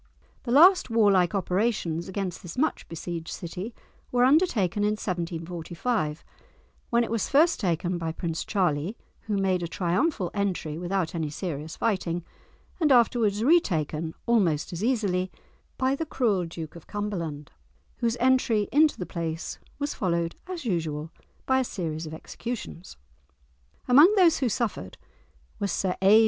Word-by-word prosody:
The 235 Hz, -, -2 dB
last 355 Hz, +7 st, +7 dB
warlike 200 Hz, -6 st, +3 dB
operations 180 Hz, -3 st, 0 dB
against 190 Hz, -2 st, -3 dB
this 175 Hz, +3 st, -9 dB
much 305 Hz, +5 st, 0 dB
besieged 165 Hz, 0 st, -5 dB
city 180 Hz, +5 st, -6 dB, 0.4 s
were 245 Hz, 0 st, +3 dB
undertaken 250 Hz, -, +3 dB
in 210 Hz, +1 st, +2 dB
1745, 170 Hz, -1 st, -3 dB, 0.7 s
when 235 Hz, 0 st, +3 dB
it 230 Hz, -, -4 dB
was 230 Hz, -3 st, -1 dB
first 320 Hz, +5 st, +4 dB
taken 175 Hz, -1 st, -1 dB
by 165 Hz, -1 st, -2 dB
Prince 165 Hz, 0 st, -3 dB
Charlie, 180 Hz, 0 st, 0 dB, 0.3 s
who 210 Hz, -2 st, 0 dB
made 190 Hz, -2 st, +1 dB
a 170 Hz, -, -2 dB
triumphal 185 Hz, -, 0 dB
entry 180 Hz, -6 st, -2 dB
without 180 Hz, -1 st, -1 dB
any 160 Hz, -3 st, -2 dB
serious 155 Hz, -1 st, -5 dB
fighting, 175 Hz, -6 st, -1 dB, 0.5 s
and 310 Hz, -4 st, +3 dB
afterwards 230 Hz, -4 st, +3 dB
retaken 165 Hz, -, +2 dB
almost 185 Hz, -11 st, +2 dB
as 175 Hz, +4 st, -4 dB
easily 200 Hz, -7 st, +1 dB, 0.5 s
by 260 Hz, 0 st, +2 dB
the 320 Hz, +3 st, -3 dB
cruel 210 Hz, -, +1 dB
Duke 165 Hz, -1 st, -7 dB
of 170 Hz, -, -12 dB
Cumberland, 170 Hz, -9 st, -4 dB, 0.5 s
whose 235 Hz, 0 st, 0 dB
entry 240 Hz, -4 st, +3 dB
into 305 Hz, +1 st, +4 dB
the 180 Hz, -, -4 dB
place 165 Hz, -1 st, -4 dB, 0.2 s
was 290 Hz, 0 st, -2 dB
followed, 170 Hz, -3 st, -1 dB
as 360 Hz, -6 st, -6 dB
usual, 160 Hz, -6 st, -2 dB, 0.3 s
by 260 Hz, 0 st, +3 dB
a -, -, +2 dB
series 165 Hz, -8 st, -4 dB
of 155 Hz, -, -8 dB
executions. 200 Hz, -, -7 dB, 0.9 s
Among 290 Hz, +9 st, +8 dB
those 350 Hz, -5 st, +5 dB
who 260 Hz, -3 st, +1 dB
suffered 210 Hz, -, -3 dB, 0.6 s
was 200 Hz, -, -1 dB
Sir 185 Hz, -2 st, 0 dB
A. 200 Hz, +3 st, +7 dB
190 Hz, 145 wpm, -27 LUFS, 170-235 Hz, 0.9 s, Among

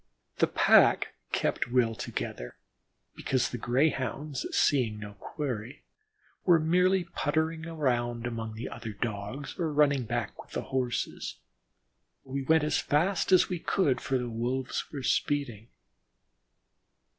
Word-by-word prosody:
The -, -, +4 dB
pack -, -, +5 dB, 0.2 s
kept 120 Hz, -, 0 dB
well 120 Hz, -3 st, +3 dB
together, -, -, -5 dB, 0.6 s
because 130 Hz, -2 st, 0 dB
the 120 Hz, -, -4 dB
Greyhounds, 135 Hz, +2 st, 0 dB
seeing 120 Hz, -7 st, +2 dB
no 105 Hz, -1 st, -8 dB
quarry, 125 Hz, +1 st, -5 dB, 0.6 s
were 175 Hz, -3 st, +5 dB
merely 180 Hz, +4 st, +3 dB
puttering 160 Hz, 0 st, -1 dB
about 120 Hz, -7 st, -1 dB
among 115 Hz, -2 st, -4 dB
the 115 Hz, -, -5 dB
other 115 Hz, -2 st, -7 dB
Dogs, 110 Hz, +5 st, -4 dB
or 165 Hz, -3 st, 0 dB
running 140 Hz, -3 st, +3 dB
back -, -, -3 dB
with -, -, -17 dB
the -, -, -2 dB
Horses. 125 Hz, -2 st, -2 dB, 0.9 s
We 135 Hz, +1 st, -4 dB
went 160 Hz, +3 st, +3 dB
as 150 Hz, 0 st, +1 dB
fast 175 Hz, +7 st, +1 dB
as 185 Hz, -, +6 dB
we 180 Hz, -2 st, -3 dB
could, 145 Hz, -8 st, +1 dB
for 135 Hz, -, 0 dB
the 125 Hz, -1 st, -3 dB
Wolves 125 Hz, +3 st, -2 dB
were 140 Hz, -3 st, -5 dB
speeding. 125 Hz, -7 st, 0 dB
130 Hz, 130 wpm, -29 LUFS, 120-155 Hz, 0.9 s, as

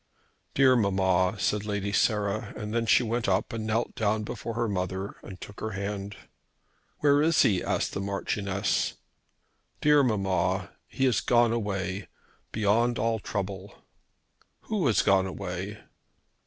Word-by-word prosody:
"Dear 130 Hz, -1 st, +6 dB
mamma!" 95 Hz, -3 st, +2 dB
said 105 Hz, +1 st, 0 dB
Lady 100 Hz, -1 st, -2 dB
Sarah; 105 Hz, -1 st, 0 dB
and 115 Hz, +2 st, -2 dB
she -, -, +5 dB
went 115 Hz, -1 st, -1 dB
up 95 Hz, +4 st, 0 dB
and 110 Hz, -1 st, -3 dB
knelt 115 Hz, +2 st, 0 dB
down 110 Hz, 0 st, 0 dB
before 115 Hz, +2 st, -5 dB
her 120 Hz, 0 st, 0 dB
mother 95 Hz, 0 st, -3 dB
and 95 Hz, -2 st, -10 dB
took 100 Hz, -, -10 dB
her 110 Hz, -1 st, -4 dB
hand. 100 Hz, 0 st, -4 dB, 0.8 s
"Where 145 Hz, 0 st, +4 dB
is 160 Hz, +1 st, +4 dB
he?" 95 Hz, -4 st, +2 dB
asked -, -, -1 dB
the -, -, -3 dB
Marchioness. 100 Hz, 0 st, -1 dB, 0.8 s
"Dear 150 Hz, -1 st, +5 dB
mamma! 100 Hz, -7 st, 0 dB, 0.2 s
He 135 Hz, -, -1 dB
has 125 Hz, -5 st, +2 dB
gone 120 Hz, -1 st, +3 dB
away, 100 Hz, -3 st, -3 dB, 0.4 s
beyond 110 Hz, +3 st, +2 dB
all 115 Hz, +1 st, 0 dB
trouble." 100 Hz, -1 st, -5 dB, 0.8 s
"Who 205 Hz, -9 st, -1 dB
has 110 Hz, -, +3 dB
gone 95 Hz, -1 st, +3 dB
away?" 95 Hz, +2 st, -5 dB
105 Hz, 140 wpm, -27 LUFS, 100-115 Hz, 0.8 s, Dear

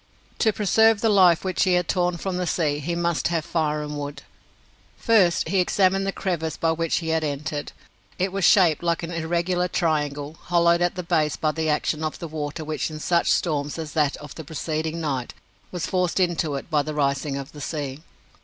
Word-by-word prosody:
To 220 Hz, -, +4 dB
preserve 220 Hz, +1 st, +3 dB
the 225 Hz, -, +3 dB
life 185 Hz, -5 st, +5 dB
which 185 Hz, -2 st, -1 dB
he 185 Hz, -, +2 dB
had 180 Hz, -1 st, +2 dB
torn 180 Hz, -1 st, 0 dB
from 185 Hz, +1 st, -3 dB
the 180 Hz, -1 st, -2 dB
sea, 150 Hz, -5 st, 0 dB
he 170 Hz, +4 st, -3 dB
must 170 Hz, -1 st, 0 dB
have 165 Hz, -2 st, -1 dB
fire 155 Hz, -3 st, -1 dB
and 150 Hz, 0 st, -5 dB
food. 145 Hz, 0 st, -6 dB, 0.7 s
First 200 Hz, -7 st, +3 dB
he 195 Hz, -, +2 dB
examined 195 Hz, +1 st, +2 dB
the -, -, +1 dB
crevice 170 Hz, -5 st, -3 dB
by 165 Hz, -, +1 dB
which 165 Hz, 0 st, 0 dB
he 165 Hz, -2 st, -2 dB
had 160 Hz, 0 st, +1 dB
entered. 150 Hz, 0 st, -3 dB, 0.5 s
It 185 Hz, +1 st, 0 dB
was 195 Hz, 0 st, -2 dB
shaped 175 Hz, -5 st, +5 dB
like 170 Hz, 0 st, 0 dB
an 165 Hz, -, -4 dB
irregular 175 Hz, +2 st, 0 dB
triangle, 150 Hz, -3 st, -1 dB
hollowed 170 Hz, 0 st, +3 dB
at 175 Hz, +1 st, +1 dB
the 180 Hz, -, -4 dB
base 160 Hz, -3 st, +1 dB
by 155 Hz, -, 0 dB
the 160 Hz, 0 st, -2 dB
action 150 Hz, +1 st, 0 dB
of 155 Hz, -, -3 dB
the 170 Hz, -, -6 dB
water 155 Hz, 0 st, -5 dB
which 155 Hz, +1 st, -2 dB
in 155 Hz, -1 st, -7 dB
such 170 Hz, +2 st, +1 dB
storms 150 Hz, -3 st, 0 dB
as 160 Hz, -2 st, -5 dB
that 150 Hz, -3 st, +1 dB
of 150 Hz, -1 st, -10 dB
the 160 Hz, -, -8 dB
preceding 160 Hz, +1 st, -3 dB
night 135 Hz, -6 st, -3 dB, 0.4 s
was 180 Hz, -2 st, -3 dB
forced 180 Hz, 0 st, 0 dB
into 170 Hz, -5 st, +1 dB
it 140 Hz, -, -7 dB
by 150 Hz, -1 st, +3 dB
the 155 Hz, +1 st, -5 dB
rising 140 Hz, -1 st, 0 dB
of 140 Hz, +1 st, -7 dB
the 150 Hz, -, -10 dB
sea. 140 Hz, -2 st, -4 dB
165 Hz, 210 wpm, -24 LUFS, 150-180 Hz, 0.7 s, life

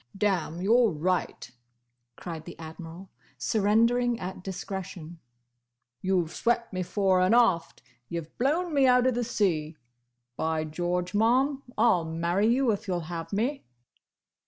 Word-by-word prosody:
"Damme, 180 Hz, -4 st, 0 dB
you 210 Hz, +4 st, +3 dB
're 245 Hz, -2 st, +5 dB
right!" 175 Hz, -4 st, -2 dB, 0.6 s
cried 165 Hz, -3 st, -7 dB
the 175 Hz, -, -10 dB
Admiral, 165 Hz, +3 st, -10 dB, 0.3 s
surrendering 230 Hz, -, +2 dB
at 185 Hz, 0 st, -6 dB
discretion. 185 Hz, -3 st, -6 dB, 0.8 s
"You've 185 Hz, -4 st, 0 dB
swept 235 Hz, -2 st, 0 dB
me 185 Hz, -, -2 dB
fore 190 Hz, 0 st, +2 dB
and 185 Hz, +5 st, +4 dB
aft! 190 Hz, -9 st, +2 dB, 0.3 s
You've 165 Hz, -2 st, -6 dB
blown 315 Hz, +7 st, +1 dB
me 275 Hz, -2 st, +4 dB
out 250 Hz, 0 st, +5 dB
of 260 Hz, -, +3 dB
the 245 Hz, +1 st, -1 dB
sea! 165 Hz, -9 st, -1 dB, 0.6 s
By 160 Hz, +2 st, -1 dB
George, 175 Hz, +3 st, -2 dB
Ma'am, 255 Hz, +6 st, +2 dB, 0.2 s
I -, -, +4 dB
'll 180 Hz, -7 st, +3 dB
marry 170 Hz, +5 st, 0 dB
you 245 Hz, +1 st, +3 dB
if 210 Hz, +1 st, -4 dB
you 185 Hz, -, 0 dB
'll 175 Hz, -, -2 dB
have 165 Hz, 0 st, -6 dB
me!" 245 Hz, +8 st, -1 dB
190 Hz, 145 wpm, -27 LUFS, 170-235 Hz, 0.8 s, re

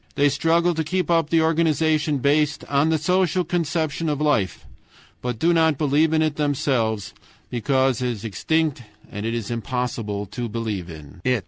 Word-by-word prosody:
They 145 Hz, 0 st, +4 dB
struggle 165 Hz, +5 st, +2 dB
to 160 Hz, 0 st, -1 dB
keep 180 Hz, +2 st, -1 dB
up 165 Hz, -2 st, +2 dB
the 165 Hz, -1 st, +3 dB
organization 155 Hz, -2 st, +2 dB
based 145 Hz, +2 st, +1 dB
on 145 Hz, +2 st, +2 dB
the 160 Hz, -, +2 dB
social 180 Hz, +3 st, +1 dB
conception 165 Hz, -2 st, -1 dB
of 145 Hz, -1 st, -1 dB
life, 145 Hz, -11 st, 0 dB, 0.6 s
but 125 Hz, -2 st, -3 dB
do 170 Hz, +8 st, +2 dB
not 160 Hz, -3 st, +3 dB
believe 150 Hz, +2 st, +2 dB
in 160 Hz, 0 st, +3 dB
it 155 Hz, -2 st, -1 dB
themselves, 130 Hz, -8 st, 0 dB, 0.4 s
because 130 Hz, +1 st, +1 dB
it 125 Hz, -, 0 dB
is 115 Hz, -2 st, -5 dB
extinct 150 Hz, -, 0 dB, 0.3 s
and 105 Hz, +2 st, -4 dB
it 115 Hz, -, -1 dB
is 115 Hz, -1 st, -4 dB
impossible 115 Hz, -3 st, -3 dB
to 120 Hz, +4 st, -5 dB
believe 105 Hz, -5 st, -4 dB
in 80 Hz, 0 st, -11 dB
it. 125 Hz, -2 st, +2 dB
145 Hz, 175 wpm, -23 LUFS, 115-160 Hz, 0.6 s, They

